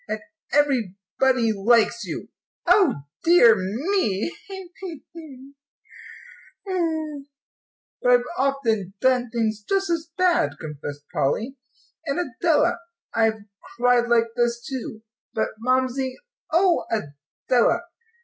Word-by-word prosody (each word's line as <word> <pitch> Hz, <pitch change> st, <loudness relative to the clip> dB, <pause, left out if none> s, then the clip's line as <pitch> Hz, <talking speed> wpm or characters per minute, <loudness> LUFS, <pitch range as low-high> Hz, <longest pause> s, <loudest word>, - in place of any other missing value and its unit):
And 215 Hz, +1 st, -3 dB, 0.3 s
everybody 245 Hz, -2 st, +1 dB
likes 230 Hz, +2 st, +3 dB
you. 170 Hz, -, -6 dB, 0.4 s
O 360 Hz, -, +4 dB, 0.2 s
dear 330 Hz, -10 st, +7 dB
me 210 Hz, -, -1 dB
tee 385 Hz, -3 st, -9 dB
hee 340 Hz, -6 st, -7 dB
boo 280 Hz, -5 st, -12 dB, 1.1 s
hoo!" 315 Hz, -6 st, -2 dB, 0.7 s
"But 245 Hz, -, +2 dB
I've 245 Hz, 0 st, +5 dB
often 230 Hz, -8 st, 0 dB
done 250 Hz, 0 st, +2 dB
things 220 Hz, -2 st, -1 dB
just 390 Hz, -2 st, +1 dB
as 330 Hz, -1 st, -2 dB
bad," 350 Hz, -, +3 dB
confessed 145 Hz, -1 st, -7 dB
Polly, 225 Hz, -, 0 dB, 0.5 s
"and, 280 Hz, +4 st, 0 dB
Adela, 340 Hz, +4 st, +1 dB, 0.3 s
I've 225 Hz, -1 st, +1 dB, 0.4 s
cried 245 Hz, 0 st, +3 dB
like 230 Hz, -1 st, +3 dB
this, 240 Hz, -1 st, 0 dB
too. 240 Hz, -4 st, -6 dB, 0.3 s
But 220 Hz, -, 0 dB
Mamsie 255 Hz, +1 st, 0 dB, 0.4 s
oh, 350 Hz, +2 st, +3 dB
Adela! 220 Hz, -, 0 dB
250 Hz, 105 wpm, -23 LUFS, 220-315 Hz, 1.1 s, dear